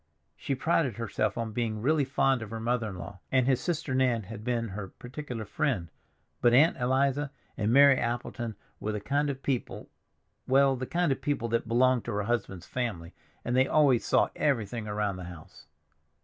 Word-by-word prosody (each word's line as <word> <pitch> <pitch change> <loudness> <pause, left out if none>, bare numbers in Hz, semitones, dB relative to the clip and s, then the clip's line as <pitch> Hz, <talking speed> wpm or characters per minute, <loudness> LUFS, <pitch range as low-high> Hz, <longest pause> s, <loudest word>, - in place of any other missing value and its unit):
She 135 - -3
prided 140 -3 +1
herself 105 -2 -1
on 115 -1 -2
being 110 -1 -2
really 145 +5 +2
fond 135 -1 +1
of 110 - -6
her 115 +1 -5
mother 115 -1 -1
in 95 - -7
law, 90 +2 -8
and 130 -2 +3
his 130 -1 +2
sister 165 -5 -2
Nan 125 -4 +2
had 105 +2 -9
been 115 -1 -1
her 100 0 -6
particular 125 +1 -7
friend, 100 - -1 0.5
but 120 0 +5
Aunt 155 +6 +5
Eliza 135 +3 +1 0.3
and 110 +1 0
Mary 140 +1 +7
Appleton 120 -1 -3 0.2
were 110 - -3
the 105 - -2
kind 145 +7 0
of 135 -1 -5
people—well, 135 +1 -1
the 130 0 -5
kind 175 -3 +1
of 135 - -1
people 130 -5 -1
that 115 0 0
belonged 125 +1 +3
to - - -3
her 105 0 -1
husband's 100 -5 -2
family, 105 -10 -4 0.3
and 120 - 0
they 130 +1 +4
always 140 -6 +4
saw - - +3
everything 115 -5 -1
around 105 -2 -1
the 90 - -7
house. 85 -2 -12
120 Hz, 185 wpm, -29 LUFS, 110-135 Hz, 0.5 s, Mary